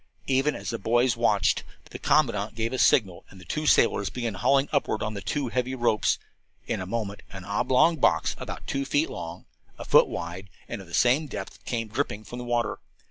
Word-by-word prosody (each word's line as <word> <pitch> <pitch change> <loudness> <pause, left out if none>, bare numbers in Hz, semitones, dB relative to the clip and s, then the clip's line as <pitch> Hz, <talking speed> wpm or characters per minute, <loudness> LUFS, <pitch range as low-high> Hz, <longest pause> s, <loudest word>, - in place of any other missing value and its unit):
Even 135 +3 +2
as - - -5
the 115 - -4
boys 120 +4 +2
watched, 110 -4 +2 0.3
the - - -7
commandant 115 -8 +1
gave 115 +2 -2
a 130 - -2
signal 105 -5 +3
and 95 - -14
the 150 - -4
sailors 100 -6 +4
began 120 -2 -3
hauling 135 +7 +2
upward 135 -7 0
on 105 0 -2
the 100 - -6
two 135 +6 -2
heavy 125 +2 -1
ropes. 120 -4 +2 0.5
In - - -2
a 95 - -5
moment 105 -1 -3
an 95 -1 -8
oblong 130 - +3
box, - - +2
about - - -7
two 140 0 -2
feet 145 +3 0
long, 85 +1 -7 0.3
a - - -7
foot - - +6
wide 90 +3 -6 0.2
and 115 - -5
of 95 - -13
the 85 - -4
same 130 +6 +3
depth, 100 -7 -7
came 115 -2 -2
dripping 110 -2 -2
from 120 +3 -8
the 125 - -6
water. 120 -1 -1
115 Hz, 200 wpm, -26 LUFS, 100-130 Hz, 0.5 s, foot